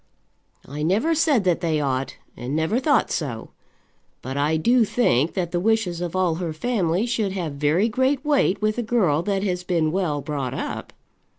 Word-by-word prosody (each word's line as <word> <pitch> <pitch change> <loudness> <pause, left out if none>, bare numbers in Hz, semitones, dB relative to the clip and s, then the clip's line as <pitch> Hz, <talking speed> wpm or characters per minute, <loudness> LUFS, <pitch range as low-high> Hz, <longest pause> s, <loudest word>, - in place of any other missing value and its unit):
"I 145 +3 -6
never 205 - +2
said 300 -8 +2
that 180 -3 +1
they 160 -3 0
ought, 135 -2 -2 0.2
and 125 +4 -4
never 160 +10 +1
thought 290 +2 +2
so. 120 -8 -4 0.7
But 130 +2 -5
I 150 +3 +1
do 235 +9 +3
think 170 - +1
that 175 -3 -2
the 175 - 0
wishes 200 -4 0
of 175 0 -4
all 185 -3 +2
her 165 -3 -3
family 190 -1 0
should 225 -5 -1
have 170 -6 -3
very 150 +8 +2
great 260 +4 0
weight 285 -10 +2
with 215 +2 +1
a - - +1
girl 210 -10 +1
that 195 +1 -1
has 180 -3 -2
been 170 -4 0
well 170 -5 -1
brought 140 -3 -4
up." - - -5
180 Hz, 185 wpm, -23 LUFS, 155-225 Hz, 0.7 s, do